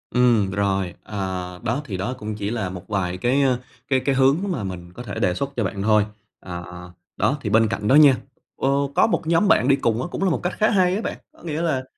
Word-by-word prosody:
Ừm, 120 -6 +3
r - - -5
rồi, 95 -3 0
à, 105 - -9 0.5
đó, 120 +5 -1
thì 100 -7 -4
đó 100 +7 -2
cũng 110 -2 -5
chỉ 105 0 -3
là 110 -5 -2
một 90 -1 -9
vài 90 -4 -2
cái, 125 +8 +2
ơ, 130 -3 +2 0.3
cái 130 -1 +2
cái 135 +1 0
hướng 135 +3 +4
mà 130 - -2
mình 90 -2 -7
có 120 - -8
thể 105 -4 -7
đề 90 -3 +2
xuất 140 +9 -2
cho 115 - 0
bạn 100 0 -3
thôi. 105 0 +3 0.3
À, 90 -1 -7
à, 90 0 -10 0.3
đó 140 - +1
thì 105 - -3
bên 110 +1 +4
cạnh 105 - -3
đó 135 - +5
nha, 145 -4 +7 0.4
ơ, 135 - 0 0.3
có - - +5
một 190 - -1
nhóm 170 +5 +3
bạn 125 - +4
đi 140 - +5
cùng 115 -3 0
á - - -3
cũng - - -3
là 190 - +3
một 160 - 0
cách 180 - -1
khá 215 - +3
hay 185 -3 +3
á 210 - -2
bạn, - - -4 0.2
có - - -20
nghĩa 160 -1 -3
là, 155 -6 0
115 Hz, 265 wpm, -22 LUFS, 100-140 Hz, 0.5 s, nha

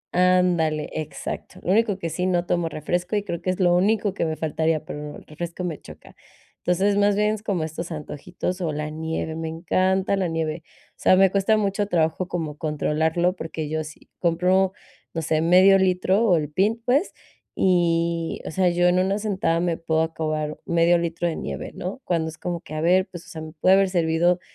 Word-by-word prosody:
Ándale, 180 -4 +2
exacto. 155 -1 -6
Lo 180 - 0
único 210 -1 +2
que 170 -4 -4
sí, 180 +3 -1
no 175 -1 +1
tomo 175 -2 0
refresco 175 +6 -2
y 205 - 0
creo 170 -4 -4
que 185 - -2
es 185 - -1
lo 175 -2 +4
único 205 +2 +2
que - - -1
me 160 -1 -2
faltaría, 160 0 -1
pero 150 0 -7
el - - -15
refresco 170 +3 -6
me 170 -4 -4
choca. - - -14 0.4
Entonces, 195 +3 +1
más 205 0 +3
bien 210 +1 +2
es 215 - -5
como 200 -6 -1
estos 160 +2 -5
antojitos 165 +4 -5
o 165 -3 -1
la 150 0 -4
nieve, 160 0 -3
me 160 0 -4
encanta 185 +4 +1
la 190 -2 0
nieve. 165 -1 -2 0.3
O - - -44
sea, - - +4
me 190 0 +5
cuesta 200 +3 +2
mucho 205 0 0
trabajo 170 0 0
como 160 -4 -4
controlarlo, 160 +3 0
porque 160 -3 -5
yo 155 0 -1
sí 155 0 -12
compro, 180 +2 +2 0.4
no 165 - -2
sé, 155 0 +1
medio 185 +4 +6
litro 190 +3 +2
o 190 -7 +4
el 150 -2 -1
pin 205 +8 +1
pues, 280 +9 +2 0.4
y, 170 -2 +1
o - - -4
sea, 185 +2 +2
yo 175 0 +1
en 180 +1 +3
una 190 +2 +1
sentada 195 -5 0
me 170 -2 0
puedo 160 -1 0
acabar 155 -2 -3
medio 170 0 +3
litro 170 0 -2
de 165 - -2
nieve, - - -5
¿no?, 190 +9 -6
cuando 165 -5 -1
es 160 - -11
como 175 -2 -4
que, 155 - -11
a 155 - -2
ver, 185 +3 +3
pues, 175 -1 -9
o - - -15
sea, 160 -1 -7
me 155 0 -8
puede 185 +4 +4
haber 195 -1 +3
servido, 175 0 +2
175 Hz, 210 wpm, -24 LUFS, 160-185 Hz, 0.4 s, medio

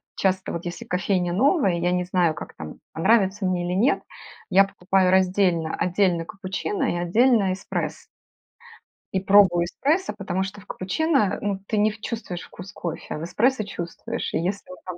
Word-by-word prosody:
часто, 190 -1 0
вот 170 +1 -5
если 175 0 -6
кофейня 180 -1 0
новая, 265 - +3
я 175 +1 +1
не 180 0 0
знаю 175 -3 +2
как - - -9
там, 80 -1 -9
понравится 195 +2 +2
мне 180 -1 0
или 180 - -2
нет, 240 +8 +3 0.5
я 195 +1 +6
покупаю 190 -1 +1
раздельно: 185 -3 +2
отдельно 180 -2 +1
капучино 190 -1 -4
и - - -1
отдельно 205 +2 +3
эспрессо. 190 - -4 1.1
И 190 - +1
пробую 190 -3 +5
эспрессо, 295 - 0
потому 190 -1 -2
что 195 +2 -7
в - - -18
капучино, 210 - 0
э, - - -7
ну 200 -2 -1
ты 215 - -1
не 210 +1 +3
в 215 0 -13
чувствуешь 205 -7 -5
вкус 185 +1 -11
кофе. 170 -2 -5
А - - -4
в 155 - -6
эспрессо 230 +7 +1
чувствуешь. 170 -4 -5
И - - +1
если 190 +4 -3
он 185 - -9
там 180 -1 -6
190 Hz, 180 wpm, -24 LUFS, 175-205 Hz, 1.1 s, я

